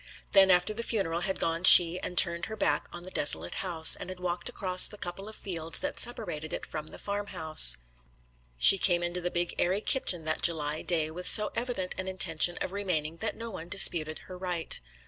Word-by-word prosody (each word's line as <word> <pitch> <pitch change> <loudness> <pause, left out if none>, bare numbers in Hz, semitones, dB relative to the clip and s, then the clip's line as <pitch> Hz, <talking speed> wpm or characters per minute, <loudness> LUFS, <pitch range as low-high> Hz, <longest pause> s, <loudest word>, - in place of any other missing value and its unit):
Then 195 -1 +4
after 180 +3 +1
the 225 - -3
funeral 195 -8 -3
had 190 +2 -4
gone 165 +1 -4
she 175 -1 +9
had 180 - -8
turned 170 0 +2
her 220 - -8
back - - -2
on 175 - -9
the 185 - -6
desolate 85 - -1
house, 165 -4 +3
and - - -10
had 185 -1 -10
walked 175 -1 -5
across 185 -2 +2
the 210 - -10
couple 195 +2 -6
of 220 - -12
fields 165 -4 -5
that 290 0 -5
separated 205 -10 -4
it - - -7
from 155 0 -9
the - - -13
farmhouse. 170 - +1 0.8
She 195 - +5
came 175 -2 +1
into 175 +1 -5
the 175 - -4
big 175 0 -4
airy 185 +3 -1
kitchen 185 -8 -1
that 155 0 -4
July 155 -2 +1
day 160 -3 -2
with 180 +3 -3
so 210 0 +4
evident 230 -6 -5
an 185 - -6
intention 175 -2 0
of 185 - -5
remaining 165 -6 -5
that - - -6
no 230 0 -8
one 170 -3 -11
disputed 160 -5 +4
her 185 - -12
right. 180 -3 -4
180 Hz, 205 wpm, -26 LUFS, 165-195 Hz, 0.8 s, she